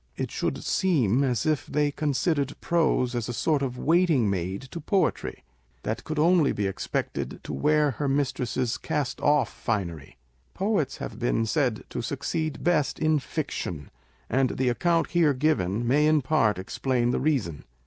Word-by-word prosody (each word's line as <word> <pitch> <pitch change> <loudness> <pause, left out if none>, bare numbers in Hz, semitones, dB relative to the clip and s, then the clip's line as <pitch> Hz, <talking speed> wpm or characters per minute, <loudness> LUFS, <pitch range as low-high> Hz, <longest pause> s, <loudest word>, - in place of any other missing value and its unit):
It - - -3
should - - -2
seem 140 - +2
as 125 -5 0
if 155 -2 0
they 145 0 +1
considered 145 -1 -1
prose 155 -7 +1
as 120 -1 -2
a - - -2
sort 150 +4 +1
of 125 -2 -2
waiting 160 - +3
maid 95 +3 -3
to 170 - -5
poetry, 190 +4 -1 0.4
that 110 - -3
could 155 -1 -4
only 165 -1 +4
be 105 - -2
expected 95 - -3
to - - -6
wear 150 0 +2
her 140 +3 -3
mistress's 130 -3 -1
cast 140 -4 -2
off 145 -4 +2
finery. 85 - -3 0.4
Poets 195 -9 0
have - - -7
been 115 -2 +1
said 125 -2 0
to 120 - -3
succeed 145 +4 -3
best 165 -5 +1
in 155 -1 +2
fiction; 110 - -4 0.4
and 130 0 +1
the 130 -1 +2
account 165 +7 +1
here 160 -5 +3
given 120 - 0
may 145 +4 +4
in 155 -2 +3
part 120 - +2
explain 120 +5 -1
the - - 0
reason. 130 - -1
135 Hz, 160 wpm, -26 LUFS, 120-155 Hz, 0.4 s, only